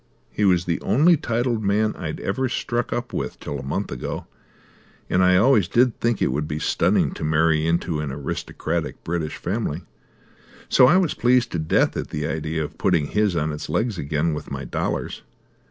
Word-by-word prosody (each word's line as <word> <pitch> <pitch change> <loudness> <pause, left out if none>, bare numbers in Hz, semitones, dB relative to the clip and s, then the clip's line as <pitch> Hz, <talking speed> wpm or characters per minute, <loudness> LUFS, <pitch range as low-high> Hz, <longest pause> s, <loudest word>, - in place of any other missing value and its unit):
He 105 - 0
was 90 -3 +3
the 85 -1 -1
only 160 +9 +4
titled 120 -5 -1
man 105 +2 +1
I'd - - -5
ever 130 -1 -1
struck 120 -1 -2
up 120 0 -3 0.3
till 70 - -5
a - - -7
month 70 - -3
ago, - - -5 0.9
and 95 - +3
I 90 0 +5
always 110 -3 +4
did 120 +3 +2
think 115 -3 +1
it - - +1
would 75 +3 -2
be 75 - -3
stunning - - +2
to - - -7
marry 80 +1 +2
into 85 -1 0
an 75 -3 -3
aristocratic 70 0 -4
British 80 -2 -3
family, 95 -5 -3 0.8
so 125 - +6
I 175 - +5
was 185 -5 +2
pleased 125 0 +2
to 85 - -2
death 80 - +2
at - - -3
the 75 0 -4
idea 80 +1 -2
of 75 - -8
putting 85 -6 +2
his 105 -3 +1
on 80 -1 0
its 75 - -6
legs 110 -5 -1
again 75 +3 0
with 75 - -6
my 70 0 -5
dollars. - - -3
90 Hz, 185 wpm, -23 LUFS, 75-120 Hz, 0.9 s, so